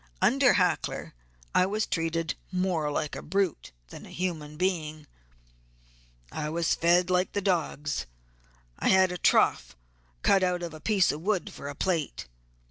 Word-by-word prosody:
Under - - +4
Hackler - - 0 0.4
I 185 - +4
was 215 +2 -1
treated 165 0 -1 0.2
more 180 -5 0
like 150 +1 -2
a - - -6
brute 195 0 -1 0.2
than - - -10
a - - -13
human 155 -4 -4
being. 155 -4 -2 1.3
I 150 - -3
was 165 +1 +1
fed 175 +2 +3
like 180 0 +1
the - - 0
dogs; 160 - -1 0.7
had 190 -1 +4
a 180 - -5
trough - - +2 0.5
dug 195 - +4
out 180 -1 0
of 170 -2 -5
a 155 - -9
piece 200 -4 +3
of 150 - -6
wood 195 -2 -1
for 140 - -8
a 145 - -6
plate. 165 - -2
175 Hz, 150 wpm, -28 LUFS, 155-185 Hz, 1.3 s, Under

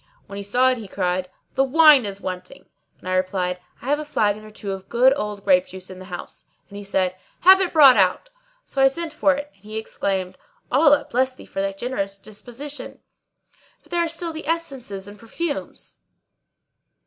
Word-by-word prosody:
When 200 - -9
he - - -4
saw 245 +6 +3
it 255 - -2
he 215 - -8
cried, 185 -1 -1 0.2
"The 270 - +3
wine 295 -2 +6
is 200 0 -5
wanting," 185 0 -7 0.3
and - - -13
I 185 - -1
replied, 185 -1 0 0.2
"I - - -10
have 290 +3 +1
a - - -3
flagon 215 -7 0
or 215 - -11
two 210 -1 -6
of 190 0 -7
good 255 +3 +5
old 210 -6 -4
grape 275 0 +4
juice 190 -6 -10
in 185 - -10
the 185 - -10
house," 180 -2 -7 0.2
and 200 - -10
he - - -8
said, 190 -2 0 0.3
"Have 380 +2 +8
it 365 - 0
brought 275 -6 +8
out!" 190 - +2 0.3
So 270 - -2
I 270 - +8
sent 325 +3 -3
for 290 -2 +3
it 290 +1 -6
and 195 - -31
he 215 +1 -6
exclaimed, 195 -4 -3 0.3
"Allah 290 -2 +5
bless 255 +1 0
thee - - -13
for - - -6
a 195 0 0
generous 195 -2 -4
disposition! 240 +8 -9 0.8
But - - -24
there 345 -1 +2
are - - 0
still 330 0 -4
the 315 -1 -7
essences 270 -12 -4
and 205 0 -12
perfumes." 290 +6 -5
220 Hz, 200 wpm, -22 LUFS, 195-285 Hz, 0.8 s, Have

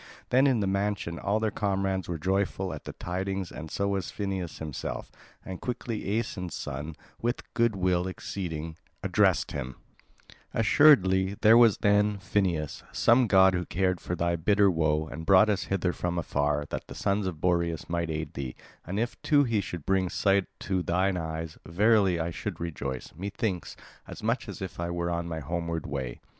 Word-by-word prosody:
Then 130 +3 +5
in 125 -5 +2
the - - +1
mansion 100 -3 -1
all 100 +2 0
their 110 -1 0
comrades 95 -2 -1
were 85 - -2
joyful 95 +1 -1
at 75 - -8
the - - -6
tidings 95 +1 -3
and 80 - -7
so 100 +4 -1
was 100 -1 -1
Phineus 95 -4 -4
himself. 75 -3 -5 0.3
And 95 -1 -7
quickly 115 -4 -2
Aeson's 90 -7 -3
son, 75 +2 -5 0.3
with 120 +2 -1
good 115 -2 +2
will 90 -1 +1
exceeding, 80 -4 -5 0.3
addressed - - +2
him: 65 0 -5 0.8
"Assuredly 100 -6 +5
there 110 +2 +7
was 115 -3 +6
then, 105 0 +3
Phineus, 90 -6 -1
some 120 +1 +4
god 95 -2 +6
who 90 0 0
cared 90 +2 0
for 90 - -3
thy 85 0 0
bitter 100 +4 +3
woe, 80 -2 +1
and 80 - -7
brought 95 +4 +6
us 95 -2 -1
hither 95 -2 0
from 90 0 -2
afar, 75 -3 0
that - - -4
the - - -9
sons 100 0 0
of 85 -4 -4
Boreas 85 -2 0
might 85 -1 -1
aid 80 -1 -3
thee; 65 -2 -5 0.3
and 95 +5 -3
if 120 +1 -3
too 145 -1 +4
he 115 -5 +1
should 90 -5 -7
bring 95 -1 +2
sight 100 0 +2
to 95 -2 0
thine 95 +2 +1
eyes, 80 -1 -4
verily 100 0 +3
I 85 +1 -1
should - - -5
rejoice, 70 -6 -5
methinks, 95 +1 -3 0.3
as - - -9
much 115 +2 -1
as - - -6
if 95 - -7
I 85 0 -2
were 85 0 -2
on 85 0 -2
my 80 -2 -4
homeward 85 +1 -3
way." 65 -4 -4
95 Hz, 180 wpm, -28 LUFS, 85-100 Hz, 0.8 s, there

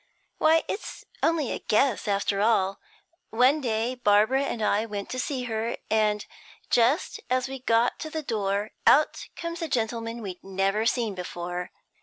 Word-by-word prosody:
'Why, 320 +1 +4
it's 405 - -6 0.2
only 320 -5 +1
a - - -3
guess, 225 +1 +1
after 200 0 0
all. 200 -3 +2 0.5
One 255 +6 +3
day 230 0 0
Barbara 220 +2 +3
and 240 - -3
I 210 0 +2
went 205 -2 -5
to 255 - -3
see 255 -1 -2
her, 230 -1 -2
and 210 -1 +2 0.5
just 245 +8 +2
as 255 0 +1
we 270 0 -6
got 235 -1 +2
to 315 - -5
the 315 0 -4
door, 205 -3 -1 0.2
out 300 +2 +4
comes 335 0 -5
a 330 - -1
gentleman 230 -2 -2
we'd 185 -3 -7
never 195 +3 0
seen 230 -3 0
before. 180 -1 -5
230 Hz, 160 wpm, -26 LUFS, 205-260 Hz, 0.5 s, Why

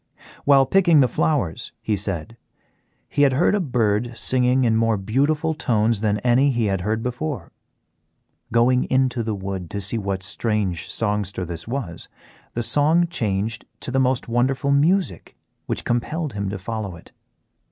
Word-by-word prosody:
While 140 -1 +6
picking 170 -3 +4
the 130 - +4
flowers, 120 - -1
he 110 - -1
said, 100 +2 -4 0.7
he - - -1
had 140 -2 +5
heard 155 +10 +3
a 205 - +2
bird 120 - 0
singing 130 0 +2
in 115 -2 +2
more 115 -1 +2
beautiful 145 +10 0
tones 115 -7 +1
than 105 -1 +1
any 125 +4 +3
he 120 -4 0
had 95 -3 0
heard 110 +4 -1
before. 125 - -4 1.0
Going 120 +2 +3
into 130 -2 +1
the 110 -2 -2
wood 95 -3 -5
to 100 - -4
see 100 +4 0
what 100 -2 -3
strange 100 -5 -2
songster 105 -4 -2
this 85 +1 -7
was, 115 -9 -5 0.5
the 120 - -1
sound 160 +6 +3
changed 110 - -2 0.2
to 130 +1 -1
most 130 -1 +1
wonderful 130 +4 +1
music 170 +7 +1 0.3
which - - -1
compelled 150 +5 -1
him 100 -1 -3
to 100 - -4
follow 100 -1 -5
it. 85 - -16
120 Hz, 155 wpm, -22 LUFS, 105-135 Hz, 1.0 s, While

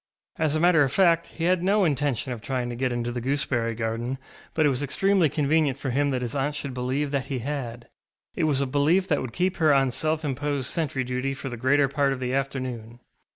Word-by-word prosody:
As 155 -2 +1
a - - +1
matter 170 -2 +5
of 135 -3 +2
fact, 170 0 +3
he 165 - -7
had 180 0 +3
no 200 +2 +3
intention 140 -4 0
of 115 - -8
trying 125 +3 -2
to 120 - -4
get 130 +1 -1
into 120 0 -2
the 120 0 -4
gooseberry 120 -3 -1
garden, 115 +3 -2 0.4
but 155 - +3
it - - +5
was 130 -1 -1
extremely 185 +4 +2
convenient 150 -1 +1
for 135 -2 -3
him 145 +3 +1
that 130 -2 -1
his 120 +3 -4
aunt 145 +2 -1
should 140 -2 -5
believe 130 +3 -1
that 140 -2 -1
he 135 -2 -2
had; 120 -5 -4 0.5
it - - 0
was 140 -3 +1
a - - +1
belief 145 +8 +2
that 145 - +2
would 130 - -5
keep 180 +5 0
her 155 -2 +4
on 135 -2 +3
self 155 +4 -1
imposed 140 -1 -2
sentry 145 -5 -1
duty 125 +2 -2
for 135 0 -6
the 120 - -5
greater 135 +4 +3
part 140 0 +1
of 130 - -6
the 125 0 -2
afternoon. 130 -4 -3
140 Hz, 235 wpm, -25 LUFS, 125-150 Hz, 0.5 s, matter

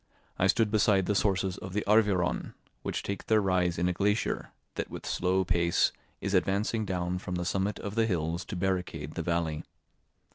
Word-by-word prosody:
I 95 - +4
stood 110 +2 +3
beside 105 -3 +3
the 105 - +1
sources 95 -2 +1
of 95 0 -7
the 105 - 0
Arveiron, 100 -4 +2 0.3
which - - -3
take 100 - -4
their 110 -1 +5
rise 90 -3 +1
in 90 +1 +1
a 90 - +1
glacier, 105 +4 0 0.2
that - - -4
with - - -8
slow 95 +1 +1
pace 85 0 +2 0.3
is 100 +1 -2
advancing 100 +4 +1
down 90 -1 -1
from 90 0 -4
the 90 0 -2
summit 95 +2 0
of 100 - -5
the 115 0 +2
hills 85 -2 -1
to - - -5
barricade 90 -5 -2
the - - -3
valley. 80 -2 -1
95 Hz, 185 wpm, -29 LUFS, 90-100 Hz, 0.3 s, their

